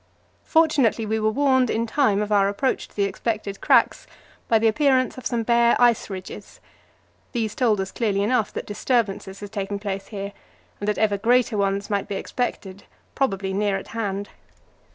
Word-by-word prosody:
Fortunately, 290 Hz, -9 st, +2 dB
we 220 Hz, +1 st, -1 dB
were 215 Hz, 0 st, +2 dB
warned 260 Hz, 0 st, +2 dB
in 230 Hz, +1 st, 0 dB
time 220 Hz, -5 st, +2 dB
of 210 Hz, -, -6 dB
our 200 Hz, -1 st, +4 dB
approach 255 Hz, +6 st, -1 dB
to -, -, -26 dB
the 205 Hz, -, +1 dB
expected 200 Hz, 0 st, -3 dB
cracks -, -, +3 dB, 0.4 s
by 225 Hz, -, +4 dB
the 225 Hz, +1 st, +2 dB
appearance 260 Hz, +2 st, +2 dB
of 255 Hz, -, -4 dB
some 235 Hz, -2 st, -1 dB
bare 235 Hz, 0 st, +4 dB
ice 240 Hz, -3 st, +3 dB
ridges. 185 Hz, -2 st, -9 dB, 0.7 s
These 225 Hz, -4 st, -1 dB
told 225 Hz, -5 st, +1 dB
us 190 Hz, 0 st, -3 dB
clearly 200 Hz, -4 st, 0 dB
enough 225 Hz, 0 st, +1 dB
that -, -, -5 dB
disturbances 205 Hz, -3 st, -1 dB
had 205 Hz, -1 st, -8 dB
taken 200 Hz, -1 st, -3 dB
place 200 Hz, -1 st, -5 dB
here, 200 Hz, -1 st, -6 dB, 0.5 s
and 205 Hz, -, -4 dB
that 210 Hz, -, 0 dB
even 205 Hz, -2 st, +1 dB
greater 240 Hz, +1 st, +2 dB
ones 200 Hz, 0 st, -1 dB
might 200 Hz, -1 st, -1 dB
be 200 Hz, -, -4 dB
expected, 200 Hz, -3 st, -4 dB, 0.3 s
probably 195 Hz, -7 st, -1 dB
near 200 Hz, 0 st, 0 dB
at 190 Hz, -, -9 dB
hand. 205 Hz, -3 st, -3 dB
215 Hz, 175 wpm, -23 LUFS, 200-240 Hz, 0.7 s, our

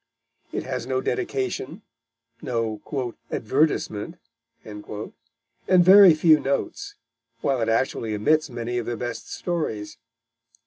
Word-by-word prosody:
It -, -, -3 dB
has 130 Hz, -2 st, -4 dB
no 130 Hz, 0 st, 0 dB
dedication, 355 Hz, -, -3 dB, 0.6 s
no 115 Hz, -3 st, -2 dB, 0.5 s
"advertisement," 135 Hz, 0 st, 0 dB, 0.5 s
and 105 Hz, -1 st, -8 dB, 0.9 s
very 185 Hz, 0 st, +8 dB
few 155 Hz, -1 st, +5 dB
notes, 140 Hz, 0 st, -3 dB, 0.5 s
while 135 Hz, -3 st, 0 dB
it 115 Hz, -, 0 dB
actually 115 Hz, -2 st, 0 dB
omits 155 Hz, +9 st, +2 dB
many 120 Hz, 0 st, -3 dB
of 120 Hz, -, -6 dB
the 120 Hz, -, -3 dB
best 120 Hz, 0 st, -6 dB
stories. 115 Hz, -, -4 dB
130 Hz, 105 wpm, -24 LUFS, 115-160 Hz, 0.9 s, very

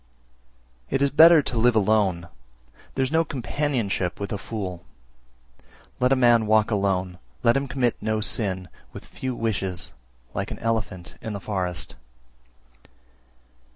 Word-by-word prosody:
330. -, -, -1 dB
It 135 Hz, -, +1 dB
is 140 Hz, -, -2 dB
better 165 Hz, -1 st, +8 dB
to 120 Hz, -, -2 dB
live 120 Hz, 0 st, +4 dB
alone, 100 Hz, -5 st, +2 dB, 0.7 s
there 135 Hz, -, +1 dB
is 130 Hz, -, -2 dB
no 165 Hz, +1 st, +3 dB
companionship 120 Hz, -, -2 dB
with 100 Hz, 0 st, -4 dB
a -, -, -1 dB
fool; 95 Hz, -6 st, -5 dB, 1.2 s
let 125 Hz, 0 st, +2 dB
a -, -, +6 dB
man 120 Hz, -3 st, +4 dB
walk 110 Hz, +1 st, +3 dB
alone, 95 Hz, -3 st, 0 dB, 0.2 s
let 115 Hz, -, +4 dB
him 135 Hz, 0 st, 0 dB
commit 130 Hz, -2 st, 0 dB
no 110 Hz, 0 st, 0 dB
sin, 100 Hz, -5 st, -1 dB, 0.3 s
with -, -, -9 dB
few 130 Hz, -1 st, -5 dB
wishes, 95 Hz, -5 st, -2 dB, 0.4 s
like 100 Hz, +1 st, -3 dB
an -, -, -6 dB
elephant 100 Hz, -7 st, -3 dB
in 110 Hz, -, -5 dB
the 100 Hz, -, -4 dB
forest. 90 Hz, -3 st, -3 dB
110 Hz, 145 wpm, -24 LUFS, 95-125 Hz, 1.2 s, better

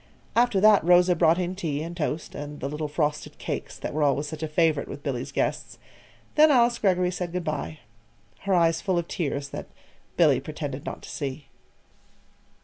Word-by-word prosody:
After 240 Hz, -3 st, +3 dB
that, 210 Hz, -2 st, +6 dB
Rosa 180 Hz, +1 st, +5 dB
brought 165 Hz, 0 st, +4 dB
in 180 Hz, 0 st, -1 dB
tea 155 Hz, -6 st, -3 dB
and 170 Hz, +1 st, -6 dB
toast, 155 Hz, -1 st, -3 dB
and 145 Hz, 0 st, -7 dB
the 135 Hz, -, -3 dB
little 150 Hz, +2 st, -3 dB
frosted 150 Hz, 0 st, -2 dB
cakes -, -, -5 dB
that -, -, -5 dB
were 155 Hz, -, -1 dB
always 145 Hz, 0 st, +2 dB
such 155 Hz, +1 st, -7 dB
a 160 Hz, -, -1 dB
favorite 155 Hz, -1 st, +1 dB
with 145 Hz, -, -8 dB
Billy's 135 Hz, -1 st, -3 dB
guests. -, -, -2 dB, 0.6 s
Then 310 Hz, +1 st, +6 dB
Alice 240 Hz, -3 st, +4 dB
Greggory 180 Hz, -3 st, +2 dB
said 180 Hz, -1 st, -4 dB
good 180 Hz, -1 st, -2 dB
by 145 Hz, -, -4 dB, 0.6 s
her 200 Hz, -1 st, -1 dB
eyes 165 Hz, -2 st, +3 dB
full 190 Hz, -3 st, 0 dB
of 170 Hz, -1 st, -1 dB
tears 140 Hz, -4 st, -3 dB
that -, -, -7 dB, 0.5 s
Billy -, -, +5 dB
pretended -, -, -6 dB
not -, -, -6 dB
to -, -, -9 dB
see. 135 Hz, 0 st, -5 dB
165 Hz, 185 wpm, -26 LUFS, 145-180 Hz, 0.6 s, that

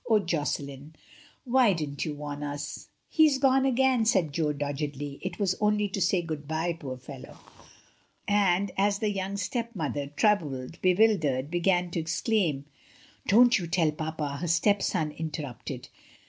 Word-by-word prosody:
"Oh, 220 Hz, -, +6 dB
Josselin, 145 Hz, -4 st, -3 dB, 0.5 s
why 250 Hz, -4 st, +4 dB
didn't 150 Hz, -4 st, -3 dB
you 150 Hz, -2 st, -3 dB
warn 145 Hz, 0 st, -6 dB
us?" 145 Hz, +1 st, -5 dB, 0.2 s
"He 315 Hz, -1 st, +5 dB
is 280 Hz, -3 st, +1 dB
gone 270 Hz, 0 st, +3 dB
again," 260 Hz, -2 st, +3 dB
said 175 Hz, -9 st, +2 dB
Jo 155 Hz, -1 st, +1 dB
doggedly; 145 Hz, -1 st, -4 dB
"it 185 Hz, -1 st, -5 dB
was 195 Hz, -3 st, +1 dB
only 210 Hz, 0 st, +2 dB
to 195 Hz, +1 st, -3 dB
say 180 Hz, 0 st, +2 dB
good 155 Hz, -3 st, -5 dB
bye, 160 Hz, +2 st, -1 dB
poor 140 Hz, -6 st, -7 dB
fellow." 130 Hz, +1 st, -11 dB, 0.9 s
And, 200 Hz, -1 st, +2 dB
as 200 Hz, 0 st, +2 dB
the 210 Hz, 0 st, 0 dB
young 195 Hz, 0 st, -3 dB
stepmother, 185 Hz, -, -3 dB
troubled, 145 Hz, -4 st, 0 dB
bewildered, 175 Hz, -9 st, +2 dB
began 175 Hz, 0 st, +1 dB
to 170 Hz, -, -2 dB
exclaim: 165 Hz, -, 0 dB, 0.6 s
"Don't 240 Hz, +3 st, +6 dB
you 175 Hz, -, -4 dB
tell 165 Hz, -2 st, +2 dB
papa," 155 Hz, -2 st, -4 dB
her 175 Hz, -, -2 dB
stepson 170 Hz, -2 st, +1 dB
inter 155 Hz, 0 st, -5 dB
rupted. 125 Hz, -1 st, -7 dB
165 Hz, 150 wpm, -28 LUFS, 145-205 Hz, 0.9 s, Oh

